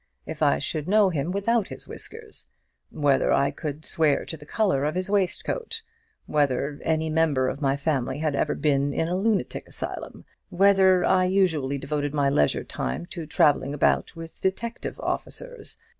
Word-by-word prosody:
if - - -7
I 70 - +4
should 150 - -3
know 205 -1 +4
him 150 0 -2
without 200 +3 +1
his - - -8
whiskers? 450 -1 -8 0.4
whether 145 -3 +2
I 140 0 +3
could 150 0 -6
swear 155 -3 +2
to - - -6
the 150 -1 -14
colour 190 -10 +1
of 150 +3 -1
his 185 +2 -2
waistcoat? 455 - -1 0.4
whether 145 -1 0
any 160 0 0
member 155 -5 +2
of 135 +3 -4
my 135 -1 +1
family 135 -3 -1
had 155 -1 -1
ever 150 - 0
been 140 -1 +1
in 160 - 0
a 175 - -1
lunatic 205 +2 -1
asylum? - - -6 0.2
whether 190 -1 +4
I 185 -1 +4
usually 165 -8 +1
devoted 145 +1 -2
my 140 -1 +2
leisure 75 - +2
time 65 - -4
to 170 -4 -6
travelling 145 -2 +2
about 145 - +1
with 165 0 -10
detective 230 +5 -3
officers? - - -5
155 Hz, 165 wpm, -25 LUFS, 140-190 Hz, 0.4 s, I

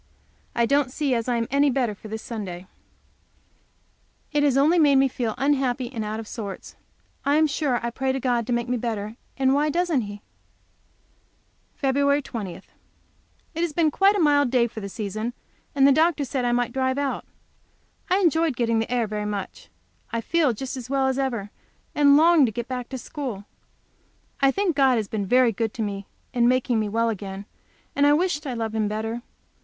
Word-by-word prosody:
I 235 - +3
don't 280 +1 +2
see 285 -1 0
as 230 0 -1
I 245 - +1
am 230 -1 -1
any 280 +1 +4
the - - -1
better 245 -5 +1
for 205 - -12
this 220 +1 -6
Sunday, 190 -6 -6 1.7
it 295 -1 +1
has 280 -2 +3
only 315 +6 +4
made 290 -3 +5
me 270 0 +5
feel 240 -4 -3
unhappy 265 -2 0
and 225 -3 -3
out 215 +1 -4
of 225 - -7
sorts. 205 -5 -7 0.5
I 285 +1 +2
am 315 +1 +5
sure 280 -4 0
I 235 - -2
pray 265 +2 -1
to 265 - -2
God 240 -3 0
to - - -2
make 235 0 -1
me 250 0 0
better, 220 -2 -4 0.2
and 265 -1 +3
why 295 +2 +2
doesn't 340 -3 +1
He? 205 -1 -8 1.6
Feb. 280 +1 +2
20. 205 -9 -5
It 190 - -13 0.9
has 335 -2 -1
been 315 -1 +2
quite 395 +6 +4
a - - 0
mild 290 -4 +4
day 245 -1 +3
for 225 -1 -6
the 200 -1 -6
season, 215 +3 -4 0.4
and 275 -1 +5
the - - +6
doctor 310 0 +3
said 260 -2 -2
I 240 - +2
might 245 0 0
drive 260 0 0
out. 280 -1 -2 0.9
I 370 - +4
enjoyed 330 -5 +2
getting 230 -1 +1
the 225 - -3
air 245 -2 +1
very 210 0 -4
much. 200 - -6 0.4
I 230 - -1
feel 305 +4 +2
just 255 +1 -6
well 270 -1 +1
as 265 +1 -1
ever, 235 -7 -2 0.4
and 285 -1 +5
long 320 -3 +6
to - - -2
get 235 +2 -5
back 250 -2 -5
to 265 - -5
school. 245 -6 -6 1.0
I 275 - +5
think 370 +2 0
God 270 -2 +4
has 215 -2 -1
been 205 -2 -3
very 250 +2 +4
good 225 0 -3
to 225 - -2
me 200 -1 -4 0.3
in 240 -2 +3
making 250 -2 +2
me 215 -1 -1
well 230 +2 +1
again, 195 -2 -5 0.5
and 290 +1 +4
wish 345 -4 0
I 255 - -3
loved 225 -1 -3
Him 220 -1 0
better. 220 +3 -3
250 Hz, 200 wpm, -24 LUFS, 225-280 Hz, 1.7 s, the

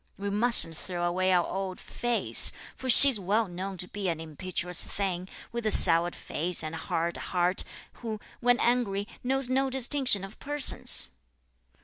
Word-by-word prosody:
We 200 0 -6
mustn't 210 -6 +2
throw 175 +2 -7
away 185 +2 -2
our 180 -1 0
old 190 -1 -7
'face,' 240 -1 +4 0.2
for 260 - -9
she's 260 -1 +8
well 205 +4 -2
known 185 +2 -8
to 180 - -4
be 200 -1 -6
an 165 -2 -5
impetuous 175 +2 -1
thing, 185 -2 -5 0.2
with 235 0 -7
a 215 - -2
soured 170 -3 +6
face 170 +3 -2
and 155 0 -7
a - - -7
hard 165 +1 -4
heart, 180 0 -3 0.4
who, 220 -3 -7 0.2
when 245 0 0
angry, 210 -5 -2 0.2
knows 265 +1 -2
no 265 +1 -2
distinction 260 -5 0
of 195 +2 -13
persons." 290 -1 -1
195 Hz, 160 wpm, -25 LUFS, 175-240 Hz, 0.4 s, she's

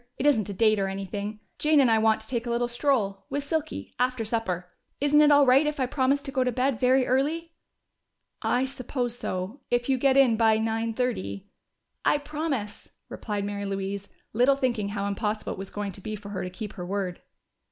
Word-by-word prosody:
It 270 - -2
isn't 220 -9 +3
a - - -3
date 215 +1 +3
or 195 - +1
anything. 200 +2 -5 0.2
Jane 305 0 +4
and 255 -4 +5
I 220 - +4
want 220 0 +3
to 220 - -9
take 240 -1 -2
a - - -2
little 240 +1 +1
stroll, 235 -6 0
with 285 +1 -2
Silky, 310 +1 -3
after 250 -2 0
supper. 200 -6 -2 0.3
Isn't 290 +1 +4
it 300 - +6
all 285 -1 +7
right 270 +4 +5
if 300 -1 -2
I 260 - +2
promise 270 +2 +1
to 275 - -4
go 260 -1 +1
to 250 - 0
bed 255 -1 0
very 255 +1 +4
early?" 310 +6 0 0.9
"I 250 +2 +1
suppose 255 -2 -3
so. 195 +3 -4
If 240 +1 0
you 265 -1 +2
get 275 +1 +3
in 250 -5 +5
by 220 -1 +4
nine 225 0 -1
thirty 220 - -3 0.3
" - - -53
"I - - +2
promise!" 290 -7 -4 0.2
replied 205 -2 -3
Mary 200 0 -3
Louise, 195 0 -3 0.3
little 250 +5 +4
thinking 240 -7 -1
how 200 -1 -3
impossible 210 +1 -2
it - - -10
was 195 - -6
going 205 -1 -4
to 195 - -11
be 215 +3 -4
for 205 -1 -9
her 200 - -4
to 180 - -4
keep 210 +3 -7
her 180 - -7
word. 185 -1 -3
235 Hz, 215 wpm, -27 LUFS, 205-270 Hz, 0.9 s, all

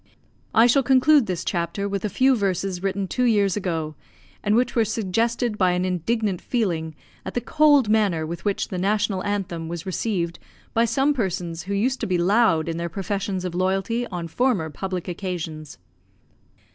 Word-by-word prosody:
I 225 - +7
shall 245 +3 +4
conclude 265 +1 +4
this 180 -2 -3
chapter 175 +3 -2
with 200 -1 -3
a 210 - 0
few 260 +7 +3
verses 190 -3 -1
written 195 0 -1
two 250 +6 0
years 205 -5 +3
ago, 165 -6 -2 0.5
and 210 0 +2
which 240 +1 +1
were 230 - +4
suggested 225 +2 -1
by 185 -2 +3
an 180 +1 0
indignant 185 +2 -1
feeling 170 -10 -1 0.3
at - - -7
the - - +2
cold 290 -1 +4
manner 205 -7 +2
with 170 +1 -6
which 205 -2 -1
the 185 - -3
National 200 0 0
Anthem 185 -5 -3
was 170 0 -5
received 180 -3 -2 0.3
by 230 0 +3
some 275 +5 +2
persons 175 -8 -2
who 200 - 0
used 250 +6 0
to 225 - -2
be 185 -2 +1
loud 175 -3 +3
in 165 0 -2
their 170 0 -3
professions 195 +1 -3
of 180 - -3
loyalty 195 +6 0
on 175 -3 -5
former 185 -4 0
public 185 +1 -4
occasions. 165 -4 -5
195 Hz, 175 wpm, -23 LUFS, 175-225 Hz, 0.5 s, I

